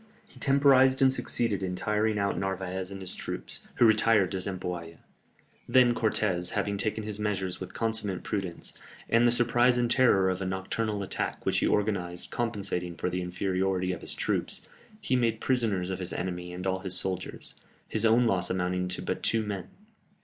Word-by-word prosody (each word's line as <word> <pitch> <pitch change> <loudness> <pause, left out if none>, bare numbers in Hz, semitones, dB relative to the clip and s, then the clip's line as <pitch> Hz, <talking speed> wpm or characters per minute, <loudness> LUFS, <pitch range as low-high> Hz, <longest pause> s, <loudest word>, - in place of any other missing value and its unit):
He - - -17
temporized 135 -1 +4
and 130 0 +5
succeeded 115 -5 -1
in 90 -1 -2
tiring 105 +2 0
out 100 0 0
Narvaez 95 -1 -3
and 100 -1 -8
his 95 - -2
troops, - - -5 0.2
who 120 - +4
retired 110 -3 +4
to 95 - -2
Zempoalla. 90 -3 -4 0.7
Then 125 0 +5
Cortès, 100 -6 0
having 100 -1 -1
taken 110 +1 -2
his 105 -1 -4
measures 95 -3 -2
with 95 -1 -8
consummate 110 -4 -1
prudence, 95 -5 -3 0.3
and 115 +1 +4
the - - +4
surprise 120 +1 +3
and 120 -1 +1
terror 100 -8 +4
of 95 +1 -4
a - - -2
nocturnal 100 +3 -2
attack - - -3
which - - +2
he - - +1
organized 95 -4 -1
compensating 100 -7 -2
for 90 - -2
the 90 - -2
inferiority 95 +1 -1
of 90 - -7
his - - -3
troops, - - -1 0.3
he 130 - 0
made 115 -3 +1
prisoners 110 -9 +1
of 95 - -4
his 90 -1 -2
enemy 90 0 -4
and 90 +1 -6
all 95 0 0
his 95 -1 0
soldiers, 95 -1 -4 0.3
his - - +3
own 115 +2 +4
loss 90 -5 +3
amounting 90 0 -1
to 90 - -3
but - - -3
two 115 -1 +1
men. 100 -3 -4
100 Hz, 180 wpm, -28 LUFS, 90-115 Hz, 0.7 s, and